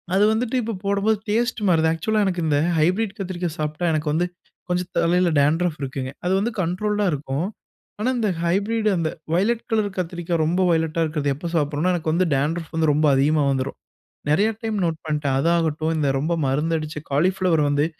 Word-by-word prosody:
அது 195 +2 +4
வந்துட்டு 230 +3 -1
இப்ப 230 0 -3
போடும்போது 200 +2 +2
டேஸ்ட் 235 +3 0
மாறுது. 160 -3 +3
ஆக்சுவலா, 215 +7 0
எனக்கு 180 -2 -1
இந்த 145 -2 +2 0.2
ஹைப்ரிட் 190 +6 +1
கத்திரிக்கா 180 -2 -3
சாப்ட்டா 155 +3 -2
எனக்கு 155 0 -1
வந்து, 170 +3 +2 0.4
கொஞ்சம் 180 0 -1
தலையில 180 +1 +3
டான்ட்ரஃப் 160 +3 +2
இருக்குங்க. 130 -1 -4
அது 180 - +2
வந்து 225 +4 -1
கண்ட்ரோல்டா 205 +4 0
இருக்கும். 145 +1 -2 0.5
ஆனா, 225 +4 +1
இந்த 220 -3 +1
ஹைப்ரிட் 205 +6 0
அந்த 165 -2 0 0.2
வயலட் 220 +7 +1
கலர் 215 -2 +2
கத்திரிக்காய் 175 -2 -2
ரொம்ப 175 +4 +1
வயலெட்டா 160 0 +1
இருக்கிறது 150 -2 -1
எப்ப 170 +5 -5
சாப்பிட்றேனா 150 +3 +1
எனக்கு 160 -2 -1
வந்து, 180 +2 +2
டான்ட்ரஃப் 155 +4 -2
வந்து 160 -2 +3
ரொம்ப 155 +2 +2
அதிகமா 145 +3 +3
வந்துரும். 135 0 -2 0.5
நெறைய 200 +9 +3
டைம் 220 -1 -2
நோட் 165 -1 -1
பண்டேன். 150 -3 0
அது 165 - +2
ஆகட்டும், 160 -1 0
இந்த 150 -2 +1
ரொம்ப 160 +5 0
மருந்து 150 +5 +1
அடிச்ச 155 0 -6
காலிஃப்ளவர் 175 +1 +2
வந்து, 145 +1 +2
170 Hz, 175 wpm, -22 LUFS, 155-195 Hz, 0.5 s, அது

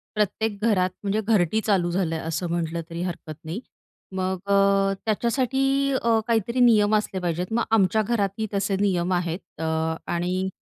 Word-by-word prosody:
प्रत्येक 210 +1 0
घरात, 190 -5 +3
म्हणजे 205 +2 0
घरटी 215 -2 +2
चालू 190 -5 +2
झालं, 175 -2 0
असं 165 +2 -2
म्हटलं 170 0 -2
तरी 170 0 -5
हरकत 175 -3 -5
नाही. 165 +6 -4 0.6
मग 185 0 -1
अ, 200 0 +3 0.5
त्याच्यासाठी 240 +4 0 0.4
अ, 230 -1 +3
काहीतरी 235 +1 0
नियम 215 -4 +5
असले 210 -3 -1
पाहिजेत. 175 0 -1
मग 235 - +2
आमच्या 220 0 +3
घरातही 215 -1 -1
तसे 195 0 0
नियम 185 -3 +1
आहेत. 175 -1 -1 0.2
अ, - - -2 0.5
आणि 180 +2 -1
195 Hz, 150 wpm, -24 LUFS, 175-220 Hz, 0.6 s, नियम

